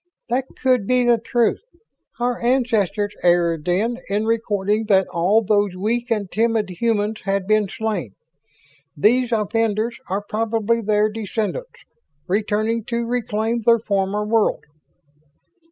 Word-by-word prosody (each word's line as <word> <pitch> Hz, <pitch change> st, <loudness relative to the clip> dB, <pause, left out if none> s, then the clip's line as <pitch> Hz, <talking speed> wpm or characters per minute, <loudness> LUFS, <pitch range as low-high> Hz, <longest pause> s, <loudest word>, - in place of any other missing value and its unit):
"That 255 Hz, +2 st, 0 dB
could 250 Hz, -6 st, +2 dB
be 250 Hz, -1 st, +3 dB
the 240 Hz, -1 st, +4 dB
truth. 235 Hz, -1 st, +1 dB, 0.6 s
Our 245 Hz, 0 st, -1 dB
ancestors 220 Hz, -5 st, +1 dB
erred, 170 Hz, -3 st, +2 dB
then, 220 Hz, +7 st, 0 dB
in 205 Hz, +2 st, 0 dB
recording 215 Hz, -1 st, 0 dB
that 190 Hz, -3 st, +4 dB
all 190 Hz, +7 st, +2 dB
those 205 Hz, -2 st, +1 dB
weak 235 Hz, +6 st, -1 dB
and 215 Hz, -3 st, 0 dB
timid 220 Hz, -3 st, 0 dB
humans 215 Hz, +2 st, -1 dB
had 195 Hz, -1 st, 0 dB
been 215 Hz, -1 st, +2 dB
slain. 195 Hz, -, -3 dB, 0.8 s
These 240 Hz, -, +3 dB
offenders 225 Hz, +1 st, 0 dB
are 195 Hz, +2 st, -2 dB
probably 225 Hz, +1 st, 0 dB
their 210 Hz, 0 st, +2 dB
descendants, 220 Hz, -, -4 dB, 0.4 s
returning 215 Hz, +3 st, 0 dB
to 235 Hz, 0 st, -2 dB
reclaim 230 Hz, -1 st, -1 dB
their 230 Hz, +1 st, +5 dB
former 205 Hz, -1 st, -1 dB
world." 220 Hz, 0 st, +1 dB
215 Hz, 125 wpm, -21 LUFS, 200-230 Hz, 0.8 s, their